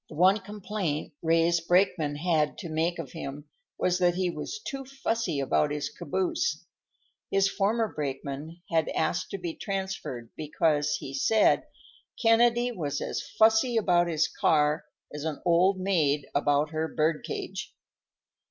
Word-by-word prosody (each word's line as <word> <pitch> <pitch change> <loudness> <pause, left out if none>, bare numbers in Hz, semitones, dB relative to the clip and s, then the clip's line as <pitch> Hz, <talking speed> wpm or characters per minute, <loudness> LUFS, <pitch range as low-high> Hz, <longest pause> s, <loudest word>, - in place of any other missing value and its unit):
The 155 - -10
one 185 +6 +5
complaint 195 -6 -4
Ray's 165 +1 +3
brakemen 175 -4 +2
had 155 -1 +1
to 170 - -6
make 165 +2 0
of 160 -6 -6
him 145 +2 -7 0.3
was 180 0 +1
that 175 -1 +3
he 180 -1 0
was 170 - -5
too 275 -1 -4
fussy 230 - -2
about 140 +2 +2
his 150 0 -2
caboose. 190 - -2 0.6
His 195 0 +3
former 215 +3 +1
brakeman 145 +1 -5
had 160 -1 +2
asked 170 +3 0
to - - -4
be 175 -3 -4
transferred 190 - -4
because, 150 -1 +1
he 135 -2 -7
said, 210 +11 +3 0.5
"Kennedy 240 +1 +4
was 155 - -3
as - - -3
fussy 220 +2 +3
about 175 -5 +3
his 160 -3 +1
car 150 -1 +2 0.3
as 150 0 -5
an 155 -2 -3
old 180 +3 +4
maid 155 -7 +1
about 145 +1 +2
her 160 0 -1
bird 155 0 0
cage." - - -5
170 Hz, 145 wpm, -28 LUFS, 150-195 Hz, 0.6 s, one